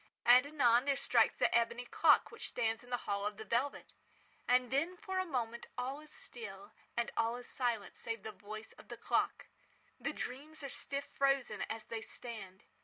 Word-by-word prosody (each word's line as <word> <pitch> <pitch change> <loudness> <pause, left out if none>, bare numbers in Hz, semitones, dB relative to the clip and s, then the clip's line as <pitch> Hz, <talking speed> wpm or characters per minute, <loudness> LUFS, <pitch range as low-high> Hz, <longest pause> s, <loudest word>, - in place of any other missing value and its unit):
And, 250 +3 +8
anon, 250 -4 +4
there 280 -1 +3
strikes 245 -4 +3
the - - +3
ebony 235 +1 +2
clock - - +5
which - - -6
stands 225 -2 -1
in 245 - -15
the 245 -1 -2
hall 200 0 0
of 210 0 -2
the 220 - -7
velvet. 240 +7 -1 0.5
And 250 0 +4
then, 325 +7 +1
for 380 0 -2
a 370 - 0
moment, 235 -5 -2
all 260 +3 -2
is 305 0 -13
still, 205 -3 -8 0.3
and 235 - +1
all 230 +1 +2
is 245 - -10
silent 235 -6 -1
save 230 -3 -4
the 220 - -4
voice 215 +1 -8
of - - -16
the - - -7
clock. - - +1 0.5
The - - -1
dreams 300 +4 -6
are 275 - -3
stiff 280 +1 -3
frozen 275 -2 +1
as 220 0 -4
they 225 -1 -4
stand. 210 -6 -8
240 Hz, 190 wpm, -35 LUFS, 225-275 Hz, 0.5 s, And